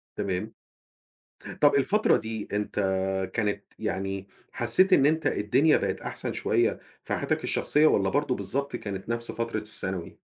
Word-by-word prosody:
تمام، 90 -2 -3 1.1
طب 145 -1 +6
الفترة 195 +11 +3
دي، 110 -1 -5
أنت 105 0 -2 0.6
كانت 105 -2 -1 0.2
يعني 95 -2 -3 0.2
حسّيت 185 +12 +3
إن 135 - +6
أنت 160 +2 +2
الدنيا 130 +10 +3
بقِت - - -2
أحسن - - -4
شوية - - +1 0.2
في - - -3
حياتك - - -1
الشخصية، 150 +1 +2
والَّا 95 -9 +3
برضه 145 +2 0
بالضبط 140 -1 -3
كانت 100 -2 -6
نفس 115 0 -2
فترة 115 -1 -2
الثانوي؟ 95 -4 -4
115 Hz, 140 wpm, -27 LUFS, 100-140 Hz, 1.1 s, طب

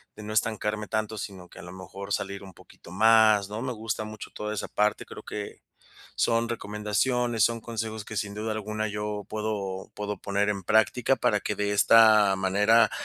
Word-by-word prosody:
de 105 - -10
no 105 - -6
estancarme 105 -1 -1
tanto, 110 +1 -2
sino 95 -3 -7
que - - -14
a - - -10
lo 90 - -10
mejor 95 +2 -7
salir 100 0 -3
un 95 -1 -12
poquito 85 - -16
más, 110 0 +5
¿no? 105 +2 -5
Me 130 0 -3
gusta 110 -1 -4
mucho 110 -1 -9
toda 105 0 -4
esa 105 - -4
parte, 105 0 0
creo - - -10
que 105 -1 -7 0.6
son 115 0 +1
recomendaciones, 115 +2 0
son 115 0 +1
consejos 110 -1 -5
que 110 - -8
sin 100 0 -3
duda 110 +1 -3
alguna 110 0 -3
yo 105 0 -4
puedo 105 -3 -4
puedo 105 0 -4
poner 100 +1 0
en 100 -2 -2
práctica 110 +6 +3
para 125 -4 +1
que 105 - -3
de 105 0 -1
esta 105 -1 +6
manera, 105 +4 +3
105 Hz, 190 wpm, -27 LUFS, 100-110 Hz, 0.6 s, esta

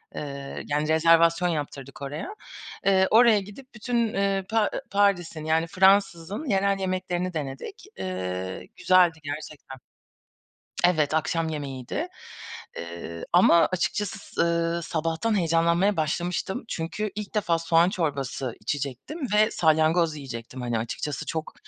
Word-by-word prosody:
ııı, 140 -1 -6
yani 150 +1 -1
rezervasyon 165 +2 +4
yaptırdık 140 -4 -5
oraya. 150 - -5 0.5
Iıı, 190 -1 +4
oraya 225 -1 +6
gidip 205 +7 -11
bütün, 230 +1 0
ııı, 195 -1 +1
Pa 225 - +2
ııı, - - -3
Paris'in, 180 -6 +1
yani 160 +1 +1
Fransız'ın 190 - +2
yerel 195 0 +2
yemeklerini 185 -1 -2
denedik. 135 -4 -6 0.2
Iıı, 95 0 -4
güzeldi 180 -3 +4
gerçekten. 145 -2 -7 1.1
Evet, 155 -4 +2
akşam 160 +1 0
yemeğiydi. 135 -5 -4 0.7
Iıı, 85 0 -7
ama 170 -1 +6
açıkçası, 205 +3 -2
ııı, 170 0 +1
sabahtan 165 +8 -1
heyecanlanmaya 170 +3 +2
başlamıştım. 175 +5 -1
Çünkü 195 +5 -3
ilk 210 0 -6
defa 175 -6 +1
soğan 165 +1 +4
çorbası 140 - -2
içecektim 140 - -4
ve 215 +1 +4
salyangoz 160 0 +3
yiyecektim. 125 -2 -7
Hani 120 -2 -1
açıkçası 145 +6 -4
çok 160 0 -4
165 Hz, 120 wpm, -26 LUFS, 145-190 Hz, 1.1 s, oraya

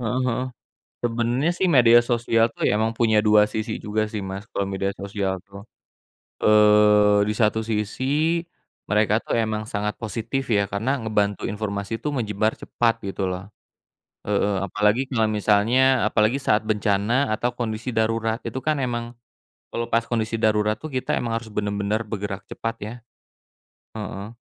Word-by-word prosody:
Heeh 125 +2 -1
heeh. 125 +1 -1 0.6
Sebenernya, 120 +6 0
sih, 185 +1 0
media 120 -6 +7
sosial, 120 -1 +1
tuh, - - -2
ya, - - +3
emang 110 - +2
punya 110 -3 +3
dua 105 -1 +5
sisi 110 +1 -3
juga, 110 +1 -2
sih, 105 -1 -4
Mas, 95 +2 -6
kalau 100 - -2
media 95 0 -2
sosial, 100 -1 -2
tuh. 100 0 -11 0.8
Eee, 105 -1 +5
di 105 - 0
satu 110 0 +2
sisi 130 +10 0 0.5
mereka, 105 0 +2
tuh, - - -2
emang 110 -2 0
sangat 105 -1 -2
positif, 115 +4 -3
ya, 100 -2 +3
karena 110 +7 0
ngebantu 105 -2 0
informasi, 105 +1 -3
tuh, 150 - -3
menyebar 110 -3 0
cepat, 115 -2 -1
gitu, 95 -1 -2
loh. 95 +3 -7 0.7
E - - -9
e 105 0 +2
apalagi 105 +6 +1
kalau 115 -4 +1
misalnya 110 +4 +3
apalagi 110 +4 +2
saat 110 -6 +2
bencana 110 +4 +1
atau 120 +2 -2
kondisi 115 0 -3
darurat, 115 -1 0
itu 120 +3 -4
kan 155 +1 0
emang 120 -2 -3 0.5
kalau 115 - -3
pas 115 0 +1
kondisi 115 -1 -1
darurat, 105 -1 +1
tuh, 155 - -6
kita 130 -3 -2
emang 115 -1 -2
harus 115 -2 -7
benar-benar 105 +1 -1
bergerak 100 -2 -5
cepat, 115 0 -4
ya. 105 +2 -5 1.0
Heeh. 105 0 -6
110 Hz, 155 wpm, -23 LUFS, 105-120 Hz, 1.0 s, media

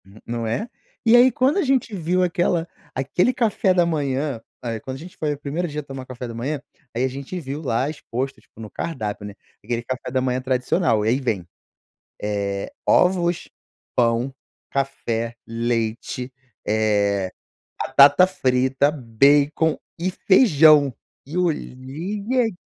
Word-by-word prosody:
N 100 +3 -17
não 115 -1 -3
é? 210 - -2 0.4
E 230 +1 +7
aí, 250 +2 +7
quando 265 +8 +2
a 395 - +3
gente 260 -5 +1
viu 180 +1 +1
aquela 175 -1 +1 0.3
aquele 145 - +1
café 215 -6 +2
da 175 -1 +4
manhã 140 -5 -1 0.2
aí, 115 -2 -3
quando 130 +4 -6
a - - -12
gente 175 +2 -11
foi 150 -1 -1
o - - -7
1º 150 +5 -2
dia 150 -1 -4
a - - -15
tomar 135 -2 -8
café 125 -1 -7
da 115 - -7
manhã, 135 +5 -3 0.3
aí 120 - 0
a - - +3
gente 140 +7 -6
viu 145 -1 -5
lá 130 -1 0
exposto, 135 -2 -4
tipo, - - -22
no 110 - -7
cardápio, 105 -10 -4
né, 105 - -7 0.3
aquele 120 +2 -2
café 125 +1 -5
da 130 0 +1
manhã 125 0 0
tradicional. 125 -3 +1
Aí 115 +5 +2
vem, 105 -10 -2 0.7
eh, 100 -1 -2
ovos, 180 -2 +3 0.5
pão, 120 +2 +1 0.4
café, 115 -4 -2
leite, 115 +2 -2 0.3
eh, 100 -3 +1 0.5
batata 145 +6 +6
frita, 135 -5 +2
bacon 145 +4 +3 0.2
e 180 +3 0
feijão. 155 - +5 0.3
E 155 +5 -7
olhei 165 +3 -3 0.2
a 210 -6 -5
135 Hz, 155 wpm, -22 LUFS, 115-170 Hz, 0.7 s, E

